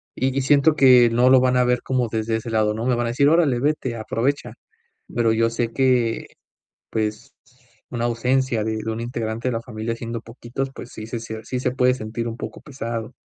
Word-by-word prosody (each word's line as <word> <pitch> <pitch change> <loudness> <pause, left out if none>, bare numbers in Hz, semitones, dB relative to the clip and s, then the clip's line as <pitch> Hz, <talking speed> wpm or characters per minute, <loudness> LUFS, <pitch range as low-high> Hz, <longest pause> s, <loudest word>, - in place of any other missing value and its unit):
y 130 +1 -1
y - - +2
siento 145 +3 +4
que 125 -4 +7
no 120 +2 +4
lo 130 -1 +7
van 125 0 +2
a 125 - +4
ver 125 0 +1
como 130 -2 0
desde 110 0 -1
ese 110 +1 -6
lado, 110 -1 +1
¿no?, 110 +2 -4
me 125 -1 +2
van 120 0 -1
a - - -1
decir: 135 +4 +3
"Órale, 150 -6 +3
vete, 135 -3 -1
aprovecha", 120 +5 -2 0.6
pero, 115 -2 +2
yo 115 +1 +2
sé 115 0 -2
que, 125 -3 +1 0.6
pues, 110 +4 -3 0.6
una 120 -1 -2
ausencia 120 0 +1
de 110 0 -2
de 110 - -2
un 110 - -4
integrante 115 0 -3
de - - -1
la 115 - -2
familia, 115 -1 -4
siendo 115 0 -5
poquitos, 120 +3 -6
pues, 125 - -10
sí, 110 - -8
se 115 0 -4
sí, 115 +2 -5
se 125 - 0
puede 125 0 +3
sentir 115 -1 -4
un 115 - -4
poco - - -7
pesado. 115 -5 -5
120 Hz, 210 wpm, -22 LUFS, 115-130 Hz, 0.6 s, que